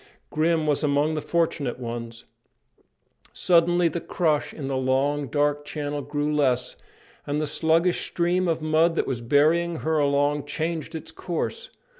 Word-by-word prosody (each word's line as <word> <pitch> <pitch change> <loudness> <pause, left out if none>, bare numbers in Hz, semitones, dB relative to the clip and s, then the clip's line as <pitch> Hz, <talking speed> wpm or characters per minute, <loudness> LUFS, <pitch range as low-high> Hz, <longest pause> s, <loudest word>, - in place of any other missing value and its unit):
Grim 160 +1 +1
was 150 -1 +1
among 145 +1 +2
the 155 - -2
fortunate 155 -6 -1
ones. 115 -1 -6 1.1
Suddenly 175 0 +3
the 165 +1 -3
crush 155 -5 0
in 140 -4 -6
the 135 - -2
long, 135 +2 0
dark 145 +3 0
channel 145 -1 -4
grew 145 +2 -2
less, 130 -4 +1 0.5
and 145 +1 -1
the 155 - 0
sluggish 165 +4 +1
stream 180 +1 0
of 165 -2 -1
mud 160 +2 +3
that - - +1
was 125 -3 -3
bearing 155 +7 +3
her 160 0 0
along 145 0 +1
changed 160 +2 -3
its 160 - -6
course. 185 - -4
150 Hz, 150 wpm, -25 LUFS, 145-165 Hz, 1.1 s, Suddenly